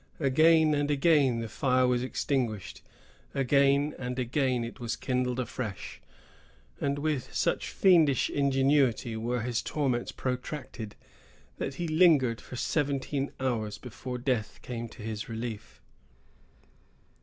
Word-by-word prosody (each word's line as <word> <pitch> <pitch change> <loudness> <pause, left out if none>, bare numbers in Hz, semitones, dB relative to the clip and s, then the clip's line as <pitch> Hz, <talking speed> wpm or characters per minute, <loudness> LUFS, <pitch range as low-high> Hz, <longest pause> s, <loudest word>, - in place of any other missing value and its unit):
Again 155 +2 +4
and 145 0 0
again 140 -5 +3
the 115 - -4
fire 130 +3 +2
was 125 -1 +2
extinguished; 125 -5 -2 0.5
again 140 +2 +3
and 125 0 -4
again 130 -1 0
it 115 +2 -7
was 120 -1 -2
kindled 125 -1 -1
afresh; 120 -4 -5 0.8
and 140 0 0
with 145 -3 -2
such - - 0
fiendish 165 -8 +4
ingenuity 135 -4 +2
were 120 +2 -2
his 120 0 -1
torments 130 -5 -1
protracted, 125 -4 -5 0.6
that 135 - -3
he 170 +3 -3
lingered 155 -8 +4
for - - -10
seventeen 140 0 -1
hours 115 -5 -1
before 125 +1 -7
death 120 -4 -1
came 120 -2 -5
to 115 - -12
his 110 -1 -5
relief. 115 -1 -6
130 Hz, 120 wpm, -29 LUFS, 120-140 Hz, 0.8 s, Again